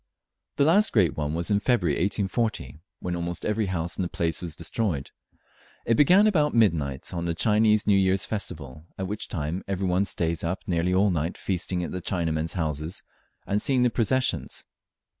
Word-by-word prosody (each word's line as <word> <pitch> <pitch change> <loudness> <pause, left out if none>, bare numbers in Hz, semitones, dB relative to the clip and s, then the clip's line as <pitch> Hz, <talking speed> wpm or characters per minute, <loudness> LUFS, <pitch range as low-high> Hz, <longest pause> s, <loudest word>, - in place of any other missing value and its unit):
The - - +3
last 200 +7 +4
great 90 - +3
one 75 0 -2
was 85 +4 -2
in 100 - +3
February 100 - +1
1840, 100 - -1 0.2
when 90 -1 -3
almost 85 0 -4
every 105 -1 0
house 85 -3 -3
in - - +2
the 90 - -2
place 85 -1 -2
was 85 -4 -5
destroyed. 85 - -2 0.7
It 115 - +3
began 180 - +6
about 155 - +2
midnight 80 - +1
on 85 -1 -3
the 85 -1 -1
Chinese 105 +1 +3
New 100 - +4
Year's 95 0 +1
festival, 75 -7 -6
at 95 - -3
which 105 +3 -4
time 80 +3 -3
every 95 0 -2
one 95 +2 +1
stays 85 -1 -1
up 85 +3 -2
nearly 85 0 0
all 95 +2 +3
night 85 +1 -2
feasting 90 -1 -2
at - - -5
the 90 - -4
Chinamen's 80 -3 -1
houses 80 0 -3 0.4
and 105 +1 0
seeing 130 -3 +2
the 125 - +3
processions. 130 +3 0
90 Hz, 180 wpm, -26 LUFS, 85-105 Hz, 0.7 s, began